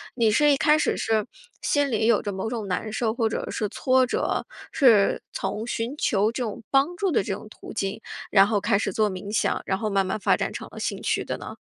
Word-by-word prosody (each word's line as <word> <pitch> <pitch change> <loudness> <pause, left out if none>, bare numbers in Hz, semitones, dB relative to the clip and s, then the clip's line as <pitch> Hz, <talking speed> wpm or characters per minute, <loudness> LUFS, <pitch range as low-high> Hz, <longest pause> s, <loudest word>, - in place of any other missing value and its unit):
你 230 -3 +3
是 295 +7 +4
一 280 - +3
开 300 +2 +4
始 310 - 0
是 220 -2 0 0.4
心 285 -1 +1
里 220 -1 +1
有 235 -3 +4
着 205 - -3
某 190 +4 -3
种 225 -4 -4
难 195 +4 -2
受 220 0 0
或 230 -2 0
者 - - -4
是 210 - -2
挫 255 +3 +2
折， 250 - -1 0.3
是 225 -8 +4
从 215 - -3
寻 240 +3 -3
求 215 -7 +1
这 245 +2 -3
种 220 -1 -5
帮 280 +6 +2
助 390 -1 0
的 245 - +2
这 195 - -3
种 215 - -8
途 - - -11
径， 195 0 -3 0.3
然 195 -1 +7
后 210 -1 +1
开 200 - +2
始 205 - -1
做 215 -1 +1
冥 195 +1 -6
想， 215 - 0
然 190 - 0
后 215 +2 -2
慢 195 -1 +1
慢 190 +3 -2
发 - - +3
展 - - -2
成 - - -7
了 - - -9
兴 - - -3
趣 - - 0
的 - - -4
呢？ - - -8
220 Hz, 260 characters per minute, -25 LUFS, 205-255 Hz, 0.4 s, 然